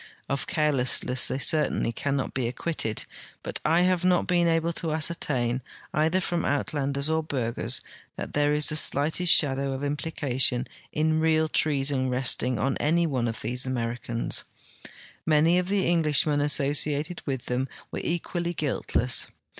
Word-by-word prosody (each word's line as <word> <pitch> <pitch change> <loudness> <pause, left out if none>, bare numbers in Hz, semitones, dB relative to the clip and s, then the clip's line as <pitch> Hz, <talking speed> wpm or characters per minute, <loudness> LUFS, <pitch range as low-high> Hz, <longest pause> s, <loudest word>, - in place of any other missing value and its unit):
Of 140 0 -3
care 150 -1 +1
lessne.ss 125 -1 +2
they - - -2
certainly 150 -4 +1
cannot 140 +3 -3
he 120 -3 -1
acciuitted, 130 -6 -2 0.4
Imt - - -4
I 165 +3 +3
have 180 -1 +1
not 180 -1 +2
been 175 -1 +2
able 165 0 0
to 165 -1 -3
ascertain, 135 -6 -1 0.3
either 160 +4 +1
from 175 -2 -2
Uitlanders 140 -1 -1
or 160 0 0
Burghers, 125 -7 -3 0.3
that - - -7
there 145 0 +1
is 150 0 +5
the 155 - -2
slightest 155 +4 +5
shadow 135 -2 +3
of 135 +1 -6
implication 140 -4 0 0.3
in 155 +1 0
real 160 0 +2
treason 140 -3 0
resting 125 -1 0
on 135 +6 -1
any 170 +3 +1
one 130 -6 -1
of 115 - -5
these 125 +2 -2
Americans. 120 -1 -2 0.8
Many 160 +3 +3
of 180 - -3
the 195 0 0
Englishmen 150 -3 +2
asso 145 -1 +2
ciated 150 +3 -1
with 130 -3 -3
them 125 +2 -2 0.2
were - - -4
equally 175 0 -3
guiltle.ss. 130 -4 0
145 Hz, 155 wpm, -26 LUFS, 130-160 Hz, 0.8 s, is